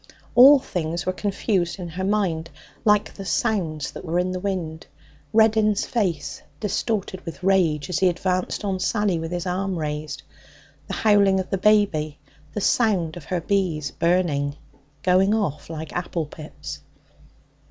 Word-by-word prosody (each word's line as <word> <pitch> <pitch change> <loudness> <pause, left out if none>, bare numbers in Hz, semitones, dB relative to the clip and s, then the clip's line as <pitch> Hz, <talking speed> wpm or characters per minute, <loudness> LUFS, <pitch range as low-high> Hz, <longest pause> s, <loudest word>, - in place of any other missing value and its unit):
All 265 +4 +9
things 170 -9 -3
were 185 - 0
confused 195 -2 -1
in 180 -2 -6
her 180 +3 -4
mind, 185 -5 0 0.3
like 210 -1 +3
the 195 - -8
sounds 180 -8 -1
that - - -9
were 170 0 -1
in 180 +1 +1
the 185 - -3
wind; 180 -5 -4 0.4
Reddin's 220 -1 +3
face, 190 -10 -2 0.2
distorted 205 -2 -2
with 165 +2 -8
rage, 175 -6 +2
as 180 -4 -1
he 185 - +4
advanced 185 +3 -1
on 190 -2 -1
Sally 200 -2 +1
with 165 +1 -5
his 175 0 -3
arm 185 +1 -1
raised; 150 -2 -4 0.6
the - - -3
howling 200 -3 +4
of 185 - -4
the 195 - 0
baby; 185 -8 +2 0.3
the 210 - -3
sound 190 -9 +2
of 175 -5 -9
her 180 -2 -2
bees 170 -6 0
burning 165 -5 +1 0.5
going 190 +3 +4
off 155 -10 -2
like 160 -1 -6
apple 175 -2 -2
pips. 150 +1 -9
185 Hz, 155 wpm, -23 LUFS, 165-200 Hz, 0.6 s, All